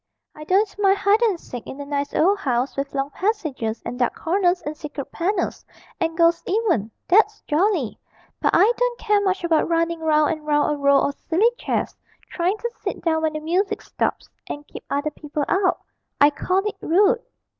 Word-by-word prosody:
'I 305 - -9
don't 395 +4 +1
mind 395 -1 +4
hide 400 +3 +3
and 420 -7 +2
seek 245 -7 -9
in 270 - -8
a 285 - -5
nice 285 0 -2
old 395 +5 +3
house 255 -5 -1
with 275 0 -4
long 275 +1 -1
passages 310 - -2
and 245 - -5
dark 245 - +1
corners 360 +1 +1
and 295 +1 -4
secret 300 -3 -7
panels 375 +6 -1 0.4
and 325 -2 -1
ghosts 335 0 +4
even 365 - +1 0.2
that's 425 +3 +4
jolly; 320 - 0 0.4
but - - +3
I 430 - +5
don't - - 0
care 420 -2 +2
much 380 -2 0
about 330 -1 +2
running 335 0 +1
round 310 -1 +3
and 310 -2 -4
round 295 0 +2
a - - -4
row 280 0 +4
of 280 - 0 0.2
silly 400 +8 +4
chairs, - - -2 0.4
trying 365 +4 0
to 475 +2 -4
sit - - -4
down 320 -2 +1
when 315 -1 0
the 305 - -3
music 355 +6 0
stops - - -2 0.2
and 290 0 -6
keep - - -10
other 285 +2 -1
people 295 0 -4
out 380 -1 +1 0.4
I 290 +1 +6
call 370 +6 0
it 420 - -4
rude.' 410 +8 +3
335 Hz, 195 wpm, -22 LUFS, 295-395 Hz, 0.4 s, I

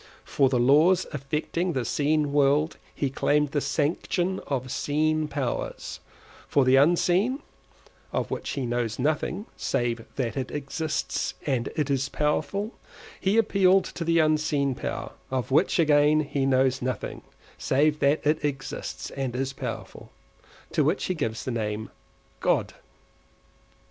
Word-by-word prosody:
For 135 -2 +2
the 130 - +1
laws 155 +9 +5
affecting 155 +5 -2
the 130 -4 -1
seen 150 +2 +1
world 145 +2 +3 0.2
he 140 -2 -1
claimed 145 +1 +1
the 145 - 0
sanction 170 +6 0
of 130 -3 -2
seen 155 +1 0
powers; 140 -4 -3 0.5
for 140 -2 +3
the 130 +1 +5
unseen 175 - +3 0.7
(of - - -2
which - - -3
he 135 -3 -2
knows 120 -2 -1
nothing 155 - -1
save 120 -1 -1
that 120 -5 -2
it 130 -2 -2
exists 150 +2 -2
and 130 -4 0
is 135 -3 0
powerful) 195 +9 -1 0.5
he 195 +3 +1
appealed 195 -3 +4
to 170 - -4
the 165 0 +2
unseen 155 -3 +2
power - - -4 0.2
(of 130 -2 -2
which, 155 +7 +3
again, 150 -1 +4
he 140 -2 -1
knows 130 0 +2
nothing 125 0 -3 0.4
save 150 +3 +2
that 140 +3 +2
it 150 +1 +2
exists 135 -2 -4
and 135 -3 -3
is 135 +1 -2
powerful) - - -7 0.6
to 150 - +2
which 160 +7 +1
he 185 - 0
gives 115 -9 -3
the 130 - -2
name 110 -2 -3
of - - -35
God. - - +1
145 Hz, 140 wpm, -26 LUFS, 130-155 Hz, 0.7 s, laws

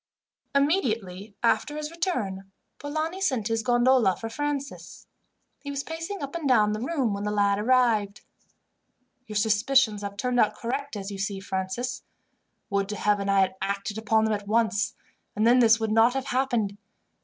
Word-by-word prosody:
Immediately 225 - 0
after 235 +6 +1
his 305 0 -4
return, 210 - -3 0.3
Polani 315 +5 -3
sent 255 - 0
his 225 0 0
gondola 240 -4 +3
for 225 - -6
Francis. 280 +2 -5 0.5
He 285 - -8
was 280 0 -3
pacing 330 +4 -5
up 275 - -5
and 325 -5 -2
down 215 -4 +4
the 215 - -3
room 260 -5 0
when 200 0 -4
the 210 - -1
lad 200 -1 +2
arrived. 220 -4 +2 1.1
"Your 215 - -7
suspicions 215 +1 +2
have 200 0 -6
turned 245 +3 0
out 215 - +3
correct, 275 +3 -4
as 200 0 -5
you 195 - -6
see, 195 0 -2
Francis. 190 +7 -3 0.7
Would 200 0 0
to 210 - -3
Heaven 205 -1 0
I 195 0 +4
had 190 0 0
acted 200 +2 -3
upon 220 0 +2
them 220 - +1
at 205 -1 -4
once, 220 0 +1 0.4
and 215 +1 +1
then 245 +2 +6
this 230 -1 +5
would 220 -1 -1
not 225 +3 +4
have 270 0 -2
happened. 240 -7 -1
225 Hz, 170 wpm, -26 LUFS, 205-270 Hz, 1.1 s, then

